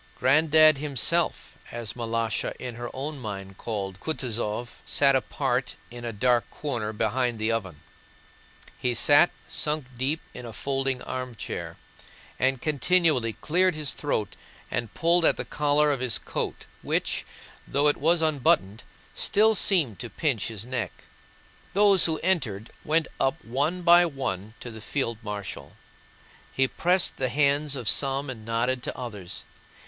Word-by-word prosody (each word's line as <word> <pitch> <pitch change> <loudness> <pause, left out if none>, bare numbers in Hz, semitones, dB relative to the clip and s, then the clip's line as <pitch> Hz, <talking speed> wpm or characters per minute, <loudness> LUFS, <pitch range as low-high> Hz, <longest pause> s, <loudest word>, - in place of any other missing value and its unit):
"Granddad" 155 +2 +5
himself, 150 +4 0
as 115 -3 -5
Malásha 115 -1 -2
in 125 -1 -6
her 120 +1 -6
own 140 +2 -5
mind 95 -4 -7
called 100 -4 -4
Kutúzov, 120 -5 -3
sat 140 -1 +3
apart 130 -1 -1 0.2
in 120 0 -9
a 120 - -3
dark 120 +2 +1
corner 120 -8 -3
behind 120 +3 0
the 110 +1 0
oven. 95 -9 -3 1.0
He 125 -1 0
sat, 145 +8 +6 0.2
sunk 150 -2 -1
deep 135 +6 -1
in 125 - -8
a 115 -2 -8
folding 135 0 -2
armchair, 130 -3 -5 0.6
and 130 0 +2
continually 150 -4 +2
cleared 180 - +1
his 150 -3 -1
throat 110 -9 -2 0.4
and 120 -3 -2
pulled 170 +1 +3
at - - +4
the - - -4
collar 150 0 +2
of 140 - -1
his 125 -2 +1
coat - - -3 0.2
which, - - -1 0.4
though 145 +2 +2
it 145 - +3
was 165 +2 +3
unbuttoned, 120 -9 +2 0.3
still 220 +2 +3
seemed 165 - +3
to 120 - -5
pinch 125 -9 -1
his 110 -1 -4
neck. 125 -2 -4 0.7
Those 200 -1 +5
who 160 -1 +1
entered 120 - 0
went 160 0 +2
up 135 +4 0
one 145 +9 -1
by 175 0 +7
one 110 - -4
to 120 - -7
the 110 -1 -10
field 115 -1 -2
marshal; 100 -8 -6 0.8
he 135 0 +2
pressed 180 +6 +1
the 130 -1 0
hands 145 +1 +2
of 125 -4 -5
some 135 +3 +2
and 110 -4 -9
nodded 120 +3 0
to - - -6
others. 105 -8 -6
130 Hz, 145 wpm, -26 LUFS, 115-150 Hz, 1.0 s, by